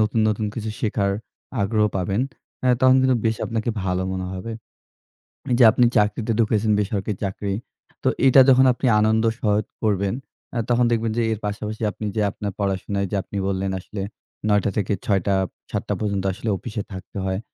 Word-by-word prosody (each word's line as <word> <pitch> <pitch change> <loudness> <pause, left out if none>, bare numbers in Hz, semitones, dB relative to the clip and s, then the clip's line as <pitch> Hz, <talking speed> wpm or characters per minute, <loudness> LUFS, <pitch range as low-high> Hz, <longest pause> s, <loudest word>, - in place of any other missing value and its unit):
নতুন, 110 +1 +2
নতুন 105 0 0
কিছু 110 -2 -3
শেখার 100 -2 +1 0.5
আগ্রহ 105 +1 +2
পাবেন, 95 +3 0 0.4
এ্যা 125 -1 +4
তখন 130 0 +6
কিন্তু 130 -1 +3
বেশ 110 0 +2
আপনাকে 115 0 -1
ভালো 90 0 0
মনে 95 0 -3
হবে। 95 +5 -5 1.0
এইযে 120 +1 +5
আপনি 120 - +4
চাকরিতে 105 +2 +1
ঢুকেছেন 110 -1 +2
বেসরকারি 105 0 -1
চাকরি। 100 0 -2 0.5
তো - - +1 0.2
এইটা 135 0 +8
যখন 130 0 +6
আপনি 125 +2 -1
আনন্দ 110 +1 +3 0.2
সহিত 105 -1 +1 0.2
করবেন। 100 -2 +1 0.4
আ - - -1
তখন 120 0 +4
দেখবেন 115 -1 +1
যে - - +3
এর 110 - -2
পাশাপাশি 105 +2 -4
আপনি 105 - -7
যে 110 - +1
আপনার 100 0 -4
পড়াশোনায় 100 0 -1
যে - - 0
আপনি 100 - -7
বললেন 95 0 -1
আসলে 100 +2 -7 0.5
৯ঃ০০ 105 -1 +4
টা - - +3
থেকে 100 -1 +1
৬ঃ০০ 100 -2 +2
টা, 100 - +3 0.4
৭ঃ০০ - - -1
টা - - +2
পর্যন্ত 100 -3 -1
আসলে 115 +3 -4
অফিসে 105 0 -5
থাকতে 95 +1 -8
হয়। 95 0 -1
105 Hz, 180 wpm, -23 LUFS, 100-115 Hz, 1.0 s, এইটা